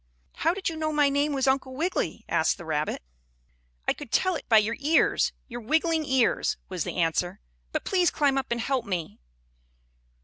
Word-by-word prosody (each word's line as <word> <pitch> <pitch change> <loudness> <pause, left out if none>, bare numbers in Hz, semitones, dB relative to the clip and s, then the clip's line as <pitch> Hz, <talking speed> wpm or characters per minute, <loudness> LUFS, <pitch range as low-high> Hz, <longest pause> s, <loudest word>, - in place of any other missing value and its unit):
"How 330 +3 +1
did 390 - -3
you 330 - -1
know 310 0 -1
my 295 -2 +3
name 285 +2 +1
was 270 -2 0
Uncle 265 -1 +1
Wiggily?" 340 +7 -2
asked - - +1
the 175 - -10
rabbit. 150 - -2 0.8
"I - - +3
could - - -10
tell 370 0 +2
it - - -7
by 225 - +7
your 215 +2 +2
ears 305 +3 +3 0.2
your 240 -1 -7
wiggling 320 +5 +1
ears," 260 -3 +2
was 180 -4 -2
the - - -5
answer. 175 +1 0 0.3
"But - - -3
please 365 -3 +3
climb 285 -3 +1
up 270 - -1
and 235 0 -1
help 260 -1 -1
me." 170 - -4
270 Hz, 190 wpm, -27 LUFS, 220-315 Hz, 0.8 s, by